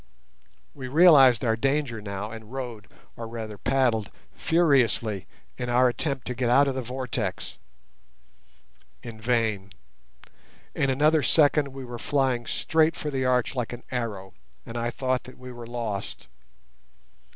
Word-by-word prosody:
We 130 -3 -7
realised 135 -5 +6
our 115 -1 +2
danger 135 -2 -1
now 100 +1 -5
and 110 -1 -10
rowed, 120 -6 -6 0.3
or 115 - -6
rather 110 -2 -7
paddled, 120 -6 +1 0.2
furiously 130 - +1 0.3
in 125 - -3
our 125 +1 +4
attempt 135 0 -3
to 125 - -3
get 125 0 -1
out 140 +3 +5
of 135 - 0
the 130 - -3
vortex. 125 -5 -4 1.4
In 115 -2 -9
vain; 110 -4 0 1.0
in 140 - 0
another 150 +4 +3
second 145 0 +3
we 135 -1 -8
were 120 -1 -7
flying 130 -4 0
straight 160 +1 +1
for 150 - -4
the 135 -2 -1
arch 125 -2 +1
like 125 -3 -3
an 120 - -9
arrow, 110 -6 -4 0.3
and 115 - -9
I 120 0 -1
thought 130 0 -2
that 130 - -12
we 125 0 -10
were 120 -1 -9
lost. 115 -5 -5
125 Hz, 145 wpm, -26 LUFS, 115-135 Hz, 1.4 s, realised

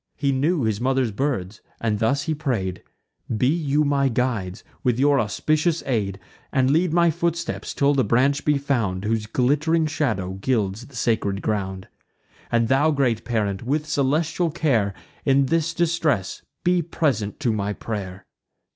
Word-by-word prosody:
He 140 -1 0
knew 145 +3 +1
his 110 -1 -1
mother's 130 -2 +1
birds; 105 -5 -2 0.2
and 110 -2 -1
thus 135 +6 +1
he 160 - -1
pray'd: 115 - -2 0.6
"Be 125 - +1
you 150 0 +2
my 140 -2 +2
guides, 115 -6 -2 0.2
with 125 -3 +2
your 140 +1 +4
auspicious 155 - 0
aid, 100 -6 -1 0.3
And 130 0 +2
lead 165 +3 +2
my 170 0 +4
footsteps, 170 +1 -2
till 140 0 +3
the 135 -2 +2
branch 135 +7 +2
be 150 -1 +2
found, 115 -10 -1
Whose 110 0 -1
glitt'ring 150 +7 +2
shadow 120 -12 -1
gilds 110 -1 -1
the 140 - -16
sacred 110 -4 0
ground. 95 -3 -2 0.6
And 115 -1 +2
thou, 135 +5 +3
great 130 -7 +1
parent, 105 -5 -1
with 145 +5 -1
celestial 155 +4 +1
care, 120 - +1 0.3
In 140 0 +3
this 165 +3 +1
distress 160 - 0 0.2
be 180 0 +3
present 140 -11 -1
to 120 -6 +1
my 105 -1 -1
pray'r!" 95 -3 -6
130 Hz, 155 wpm, -23 LUFS, 110-150 Hz, 0.6 s, your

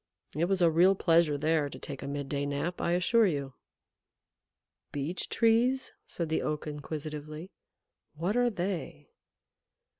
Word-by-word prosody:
It 160 +3 +2
was 185 0 +1
a 165 - +5
real 180 +4 +5
pleasure 165 -5 +3
there 155 0 +1
to - - -9
take - - -7
a - - -5
midday 140 0 -2
nap, 145 +5 -2
I 170 - +1
assure 210 +5 +4
you." 140 -5 -2 1.4
"Beech 145 +6 -3
Trees?" 240 +3 +2
said 170 - -3
the 160 - +1
Oak 150 0 -2
inquisitively. 150 +3 -6 0.6
"What 175 +8 -1
are 245 0 +3
they?" 185 - -4
165 Hz, 140 wpm, -30 LUFS, 150-185 Hz, 1.4 s, a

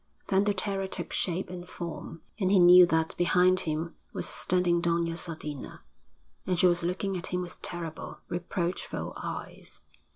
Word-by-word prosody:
Then 195 +1 +3
the 205 - +2
terror 195 0 -1
took - - -5
shape 180 0 -1
and 180 0 -8
form, 165 -1 -7 0.2
and 190 -3 +2
he 200 - +5
knew 180 0 +9
that 160 -1 +1
behind 180 +1 +4
him 165 0 -3 0.2
was - - -2
standing 175 -1 +1
Doña 170 -1 +1
Sodina, 155 -4 -5 0.6
and 180 -1 +1
she 180 - +4
was 175 -1 +4
looking 185 +3 -1
at 175 - -3
him 180 0 -1
with 175 - -9
terrible, 165 -2 -6
reproachful 175 0 -3
eyes. - - -7
175 Hz, 160 wpm, -29 LUFS, 170-185 Hz, 0.6 s, knew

